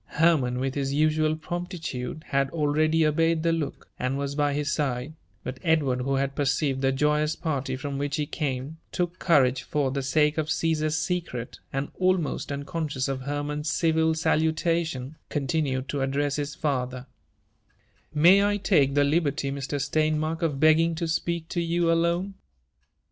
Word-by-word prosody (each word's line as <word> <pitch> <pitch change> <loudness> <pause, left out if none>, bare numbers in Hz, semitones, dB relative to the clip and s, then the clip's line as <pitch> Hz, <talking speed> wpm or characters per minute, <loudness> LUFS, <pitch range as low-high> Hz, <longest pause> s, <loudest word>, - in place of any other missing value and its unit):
i - - -10
Hermann, 150 -6 +3
with 135 0 -1
his 140 -1 -2
usual 155 +1 +2
promptitude, 160 -5 -5
had 135 0 +1
already 155 +1 +2
obeyed 165 +1 +2
the 165 - +3
look, 160 -4 -3
and 130 +2 -1
was 140 0 -2
by 145 0 +1
his 145 +1 -1
side; 135 0 -1 0.3
but 130 0 -6
Edward, 145 -7 +2
who 135 +2 0
had 135 0 0
perceived 140 -1 0
the 135 0 +3
joyous 150 +3 +1
party 140 -5 -2
from 140 +1 -4
which 145 0 -1
he 150 - -1
came, 140 +1 -3
took 180 0 -2
courage 130 -7 +3
for 145 -3 -1
the 140 +1 -2
sake 150 +3 +2
of 155 -1 -2
Caesar's 160 -1 +1
secret, 165 -11 -3
and, 135 +1 -3
almost 185 -6 +1
unconscious 140 -1 -3
of 135 -1 -3
Hermann's 145 +2 -3
civil 160 -1 +2
salutation, 160 -3 0
continued 135 -2 -1
to 140 - -2
address 140 +2 0
his 145 0 -3
father: 130 -3 -2 0.6
" - - -39
May 195 +3 +8
I 205 0 +2
take 150 -9 +2
the 145 - +5
liberty, 145 -2 +1
Mr. 140 +1 -3
Steinmark, 155 +3 0
of 150 -5 0
begging 160 +2 +4
to 165 +1 -2
speak 165 0 -2
to 175 - -1
you 170 0 +1
alone?" 170 +4 +1
150 Hz, 165 wpm, -26 LUFS, 135-160 Hz, 0.6 s, May